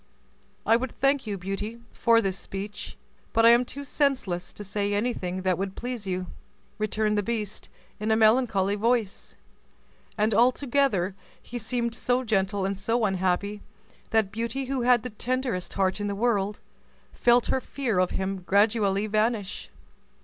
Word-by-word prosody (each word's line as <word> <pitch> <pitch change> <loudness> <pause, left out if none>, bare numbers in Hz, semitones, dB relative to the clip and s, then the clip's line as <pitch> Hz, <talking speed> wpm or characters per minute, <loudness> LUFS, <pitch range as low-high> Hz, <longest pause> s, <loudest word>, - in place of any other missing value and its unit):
"I 225 - +5
would 250 0 -4
thank 275 -2 +1
you, 205 -2 -2
Beauty, 195 +5 -5
for 230 -1 +3
this 190 -1 0
speech, 195 +2 -7 0.4
but 225 0 +4
I 230 - +9
am 240 +1 +5
too 280 +3 -7
senseless 260 - -1
to 210 - -8
say 205 0 -1
anything 185 -5 -2
that 185 -2 +1
would 195 0 -3
please 245 -4 -5
you," 185 0 -2 0.5
returned 215 0 +1
the - - +2
beast 210 -1 -4 0.3
in 215 +1 -2
a 220 - +4
melancholy 220 -3 +3
voice; 225 -1 -1 0.8
and 215 +1 +2
altogether 245 -4 +2 0.3
he 240 - -7
seemed 235 +1 -2
so 250 +2 0
gentle 195 -3 0
and 195 0 -2
so 230 +3 +1
unhappy 190 +2 0 0.5
that 220 -3 +2
Beauty, 230 +5 -3
who 265 0 -2
had 240 -2 +4
the 250 - -5
tenderest 245 -3 -2
heart 190 +1 0
in 205 - -1
the 200 - -2
world, 210 -2 0 0.5
felt 240 0 +4
her 260 - 0
fear 245 -10 -1
of 185 -1 +3
him 190 0 -2
gradually 200 +2 +2
vanish. 215 -1 -1
215 Hz, 155 wpm, -26 LUFS, 195-240 Hz, 0.8 s, I